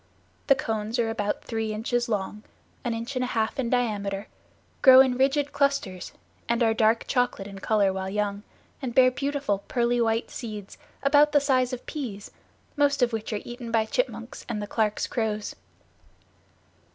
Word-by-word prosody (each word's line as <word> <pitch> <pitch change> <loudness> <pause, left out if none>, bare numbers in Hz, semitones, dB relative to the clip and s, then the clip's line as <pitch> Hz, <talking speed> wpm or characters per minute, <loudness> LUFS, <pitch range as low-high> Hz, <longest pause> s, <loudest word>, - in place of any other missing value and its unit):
The 275 - +6
cones 225 -2 -2
are 230 -2 +1
about 205 -2 -2
three 225 -2 -3
inches 240 +2 -1
long, 210 -1 -2 0.4
an 240 -2 -1
inch 230 +4 -5
and 255 - 0
a - - -1
half 225 +1 -1
in 240 -3 0
diameter, 205 -5 -1 0.5
grow 260 -1 +9
in 260 -1 +5
rigid 275 +2 +1
clusters, 280 -11 -1 0.4
and 235 +1 +2
are 225 -1 +3
dark 220 +1 +2
chocolate 245 -6 0
in 195 -1 -9
color 200 -1 +2
while 190 0 -3
young, 205 0 -2 0.4
and 250 -3 -4
bear 255 -1 +6
beautiful 275 -6 -1
pearly 240 -1 +1
white 225 0 0
seeds 210 -5 -7 0.2
about 290 +2 +5
the 290 - +6
size 260 -3 +2
of 250 -1 -6
peas, 230 -10 -6 0.4
most 285 -3 +2
of 240 -1 +1
which 220 0 -3
are 210 - -2
eaten 240 -1 -7
by 225 -1 +2
chipmunks - - -3
and 225 -3 -2
the 205 - -3
Clarke's 210 0 0
crows. 215 -3 -2
230 Hz, 170 wpm, -26 LUFS, 210-255 Hz, 0.5 s, grow